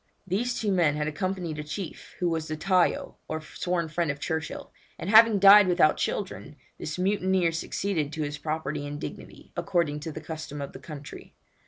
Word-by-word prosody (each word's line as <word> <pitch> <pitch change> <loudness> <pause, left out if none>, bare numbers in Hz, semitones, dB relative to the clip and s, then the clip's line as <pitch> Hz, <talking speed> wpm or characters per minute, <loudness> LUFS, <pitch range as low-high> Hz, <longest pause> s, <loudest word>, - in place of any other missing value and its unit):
These 230 +7 -1
two 210 -2 0
men 170 -6 +3
had 150 0 -1
accompanied 180 -1 -3
a - - -3
chief, 160 +3 -7
who 180 - 0
was 160 -2 -1
the 155 - -4
tayo, 180 +2 +1
or 155 - -3
sworn 170 +2 -2
friend, 165 +1 -1
of 145 0 -2
Churchill, 160 +1 -4 0.2
and 190 - -3
having 225 -1 +8
died 200 +1 +9
without 175 -4 +4
children, 190 -6 -3 0.2
this 155 - -4
mutineer 185 -2 +2
succeeded 165 -1 -2
to 155 - -2
his 145 0 -4
property 155 -2 -3
and 145 0 -5
dignity, - - -9
according 155 -4 0
to 160 +2 -5
the 155 - -6
custom 155 -2 -7
of 140 -1 -6
the - - -9
country. 145 +1 -10
165 Hz, 185 wpm, -27 LUFS, 150-185 Hz, 0.2 s, died